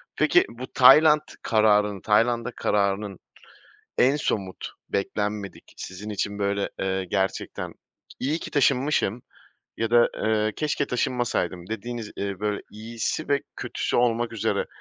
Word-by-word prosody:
Peki, - - +4
bu 125 +2 -8
Tayland 150 +4 +7 0.2
kararının, 105 -2 +3
Tayland'a 115 +3 +2
kararının 100 -3 -1 0.8
en 135 +3 +4
somut, 100 -10 -3 0.2
beklenmedik 105 0 -3
sizin 100 +4 -7
için 100 0 -3
böyle, 100 0 -1
eee, 95 0 -1
gerçekten, 95 +1 -2 0.5
"İyi 145 +5 0
ki - - -8
taşınmışım 130 -4 +1 0.5
ya 115 0 -1
da, 120 0 +5 0.2
eee, 110 0 +1
keşke 150 -2 -1
taşınmasaydım" 120 -8 -1
dediğiniz, 110 0 -5
eee, 100 -1 -4
böyle 105 -1 -1
iyisi 115 +7 -4
ve 140 0 +2
kötüsü - - -2
olmak 120 -1 +1
üzere 115 - -1
110 Hz, 120 wpm, -25 LUFS, 100-120 Hz, 0.8 s, Tayland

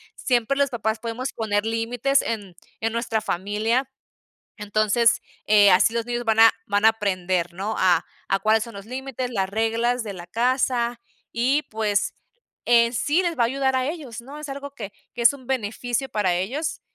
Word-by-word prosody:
siempre 250 +1 0
los 280 0 +2
papás 220 -3 -2
podemos 235 +3 -4
poner 205 -2 -1
límites 230 +4 +1
en 205 -6 -4 0.3
en 225 0 0
nuestra 230 -2 -1
familia, 215 +6 -1 0.7
entonces, 215 +2 +2 0.3
eh, 205 -1 +6
así 185 +4 +5
los 230 -1 -1
niños 240 0 -2
van 220 -1 +1
a 225 0 +8
van 205 +1 0
a - - +10
aprender, 185 -5 -1
¿no?, 195 +5 -3
a 180 -3 +3 0.2
a 195 - +2
cuáles 220 +2 +2
son 235 -2 -11
los 200 0 -9
límites, 255 0 -4
las 195 -5 -1
reglas 230 +3 0
de 210 - -5
la 175 -1 -9
casa, 240 +2 0 0.3
y 260 +6 +2
pues 215 -2 0 0.5
en 235 -1 +5
sí 295 +9 +1
les 345 -4 -2
va - - +4
a - - +4
ayudar 265 +2 0
a 255 0 0
ellos, 290 -8 -6
¿no?, 280 +5 -10
es 300 -1 -7
algo 280 +1 -6
que 205 -5 -7 0.2
que 240 - -4
es 235 - +7
un 260 -3 -13
beneficio 245 +1 -2
para 210 -6 0
ellos, 250 - -2
230 Hz, 185 wpm, -23 LUFS, 210-255 Hz, 0.7 s, a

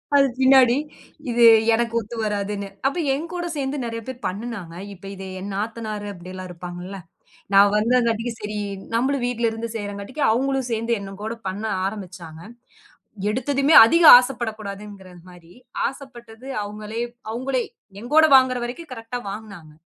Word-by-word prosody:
அது 275 -1 +6
பின்னாடி 260 -2 +6 0.5
இது 240 0 +2 0.3
எனக்கு 230 0 0
ஒத்து 225 +2 -8
வராதுன்னு. 205 -1 -2 0.2
அப்ப 275 - -2 0.2
என்கூட 340 +5 -4
சேந்து 275 0 -2
நிறைய 230 0 -5
பேர் 260 -1 -7
பண்ணுனாங்க. 200 -4 -6 0.2
இப்ப 195 0 -15
இத 195 - -9 0.2
என் 200 +2 -6
நாத்தனாரு 215 0 -4
அப்டி 180 0 -11
எல்லா 185 0 -7
இருப்பாங்களா, 180 +2 -8 0.5
நா 195 - +8 0.2
வந்தங்காட்டிக்கி 230 +1 +1
சரி 210 0 -4 0.4
நம்மளும் 260 +2 0
வீட்டுல 235 -2 0
இருந்து 225 +1 -5
செய்றங்காட்டிக்கி 205 +7 -5
அவங்களும் 265 +1 0
சேந்து 230 +1 -1
என்னக்கூட 205 +3 -6
பண்ண 195 +3 -4 0.2
ஆரம்பிச்சாங்க. 180 -5 -7 0.9
எடுத்ததுமே 275 +6 +1
அதிக 335 +9 +3
ஆசைப்படக்கூடாதுங்கிறது 210 -6 -4
மாரி 175 -1 -16 0.3
ஆசைப்பட்டது 255 -3 -11 0.2
அவங்களே 210 +2 -6 0.3
அவங்களே 255 +1 -1 0.4
எங்கூட 300 +7 +4
வாங்குற 255 -1 +2
வரைக்கு 255 +8 -7
கரெக்டா 230 +1 -6
வாங்குனாங்க. 200 -8 -10
225 Hz, 130 wpm, -22 LUFS, 200-250 Hz, 0.9 s, நா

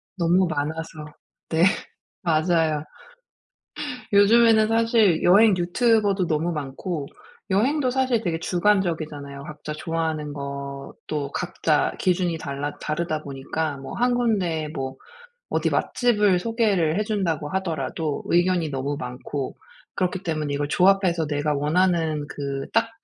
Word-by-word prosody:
너무 180 +1 +3
많아서. 155 +1 -4 0.4
네. 160 +1 +2 0.6
맞아요. 160 -2 +1 1.3
요즘에는 220 +1 +6
사실 225 -6 +3
여행 200 +3 +6
유튜버도 200 0 +2
너무 160 +2 0
많고. 150 +1 -4 0.4
여행도 255 +7 +2
사실 255 -3 +1
되게 165 -5 -2
주관적이잖아요. 165 -7 0
각자 150 0 -8
좋아하는 155 -2 -3
것도 140 +1 -6
각자 170 -4 0
기준이 180 -2 +1
달라 140 0 -5
다르다 155 0 -2
보니까 140 +2 -3
뭐 135 - -8
1 245 0 +2
군데 185 -10 0
뭐 135 -2 -4 0.5
어디 - - +1
맛집을 210 -7 +2
소개를 205 -7 +1
해준다고 190 -9 -1
하더라도 160 -4 -2
의견이 175 -2 +2
너무 140 +1 -2
많고. 125 +2 -5 0.4
그렇기 185 +1 -1
때문에 155 -4 -2
이걸 145 0 -1
조합해서 180 -4 +3
내가 145 0 0
원하는 160 0 +1
그 140 -1 -4
딱 230 0 +2
165 Hz, 275 characters per minute, -24 LUFS, 150-195 Hz, 1.3 s, 요즘에는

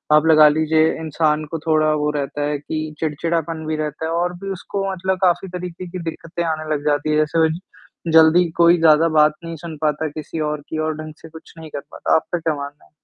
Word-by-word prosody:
आप 155 +1 +4
लगा 155 -1 +7
लीजिए 160 +1 +2
इंसान 155 -1 0
को 165 - -3
थोड़ा 155 -1 +3
वो 150 - +1
रहता 145 0 -3
है 150 - -1
कि 155 +1 -5
चिड़चिड़ापन 160 +1 -2
भी 155 - -1
रहता 155 +1 -4
है 160 - -2
और 175 +1 0
भी 195 - -3
उसको 195 +1 -4
मतलब 190 0 -1
काफ़ी 180 +1 +2
तरीके 180 0 -7
की 180 +1 -7
दिक्कतें 165 +1 -5
आने 155 -1 -3
लग 145 -1 -4
जाती 150 0 +1
हैं, 150 - +2
जैसे 155 +2 +1
वह 160 0 +4
ज 160 +2 -4 0.5
जल्दी 160 +2 +6
कोई 170 +1 +6
ज़्यादा 160 0 +5
बात 155 -1 +4
नहीं 165 0 -6
सुन 165 0 -8
पाता 155 0 0
किसी 155 +2 -7
और 150 -1 -4
की 160 - -4
और 155 - -2
ढंग 155 0 -8
से 165 - -12
कुछ 160 0 -14
नहीं 160 -1 -9
कर 145 - -4
पाता। - - 0
आपका 170 +2 -1
क्या 160 -1 -1
मानना 140 +1 -8
है? - - -27
160 Hz, 230 wpm, -20 LUFS, 155-165 Hz, 0.5 s, लगा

